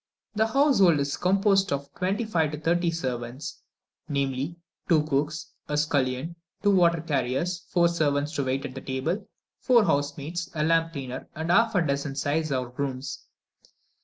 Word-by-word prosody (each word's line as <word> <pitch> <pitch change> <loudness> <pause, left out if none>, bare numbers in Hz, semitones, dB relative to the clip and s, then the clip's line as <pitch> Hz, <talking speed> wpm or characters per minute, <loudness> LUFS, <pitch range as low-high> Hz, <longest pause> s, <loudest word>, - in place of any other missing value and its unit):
The 220 +1 +2
household 225 - +4
is 140 0 -1
composed 195 +1 +2
of 140 0 0
from - - -33
twenty 195 +5 0
five 165 -8 +1
to - - -3
thirty 170 +2 +1
servants; 130 -5 -4 0.5
namely 140 +2 -1 0.3
two 160 -3 +5
cooks, 150 +1 -2 0.2
a 150 - 0
scullion, 145 +1 0 0.3
two 205 - +5
water 170 -3 +4
carriers, 150 +4 -1
four 175 -1 +4
servants 150 -3 0
to 140 - +1
wait 130 +1 -1
at 130 +1 -7
table, 135 +9 -2 0.3
four 240 -3 +5
housemaids, 145 +3 -1
a 155 - 0
lamp 165 +1 +2
cleaner, 130 -3 -6
and 160 +2 -2
half 225 +4 +4
a 180 - +4
dozen 140 -1 -1
seis 150 +2 0
or 130 -2 -1
grooms. 130 0 -4
155 Hz, 160 wpm, -26 LUFS, 140-175 Hz, 0.5 s, two